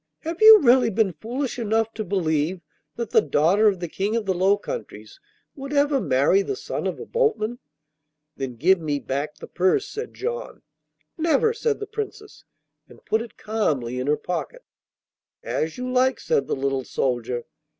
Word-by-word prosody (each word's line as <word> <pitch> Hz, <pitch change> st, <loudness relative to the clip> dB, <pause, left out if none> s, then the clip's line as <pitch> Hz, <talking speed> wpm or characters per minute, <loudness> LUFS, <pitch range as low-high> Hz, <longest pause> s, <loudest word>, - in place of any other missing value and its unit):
Have 330 Hz, +3 st, -5 dB
you 435 Hz, 0 st, +10 dB
really 250 Hz, -2 st, +5 dB
been 210 Hz, -3 st, +1 dB
foolish 250 Hz, -, -4 dB
enough 225 Hz, 0 st, 0 dB
to 215 Hz, -, -4 dB
believe 170 Hz, -3 st, -1 dB, 0.3 s
that 235 Hz, -2 st, -4 dB
the -, -, +5 dB
daughter 165 Hz, +9 st, +3 dB
of 195 Hz, -3 st, +2 dB
the 175 Hz, -, -4 dB
King 200 Hz, +6 st, -2 dB
of 230 Hz, -2 st, -1 dB
the 190 Hz, -, +1 dB
Low 190 Hz, +3 st, +3 dB
Countries -, -, -8 dB, 0.4 s
would 275 Hz, +1 st, -7 dB
ever 285 Hz, -1 st, +2 dB
marry 145 Hz, +4 st, +3 dB
the 400 Hz, -, -3 dB
son -, -, -4 dB
of -, -, -4 dB
a -, -, -7 dB
boatman?' 435 Hz, -, 0 dB, 0.8 s
'Then 135 Hz, -3 st, -5 dB
give 180 Hz, +10 st, +3 dB
me 150 Hz, -3 st, -1 dB
back 140 Hz, +2 st, -3 dB
the -, -, -10 dB
purse,' 190 Hz, -, +1 dB
said 445 Hz, +3 st, -7 dB
John. 480 Hz, +4 st, -5 dB, 0.6 s
'Never,' 330 Hz, +8 st, +2 dB
said 455 Hz, -1 st, -1 dB
the 415 Hz, -, -4 dB
Princess, 420 Hz, 0 st, -7 dB, 0.5 s
and -, -, -18 dB
put 220 Hz, -, +1 dB
it 230 Hz, -, -10 dB
calmly 140 Hz, -, -1 dB
in 130 Hz, -, -3 dB
her 150 Hz, +1 st, +2 dB
pocket. 180 Hz, -, -5 dB, 0.8 s
'As 155 Hz, 0 st, -2 dB
you 250 Hz, 0 st, -4 dB
like,' 260 Hz, +1 st, +2 dB
said 465 Hz, -3 st, 0 dB
the -, -, -1 dB
little 135 Hz, -1 st, -1 dB
soldier. 120 Hz, -2 st, -2 dB
215 Hz, 175 wpm, -24 LUFS, -, 0.8 s, you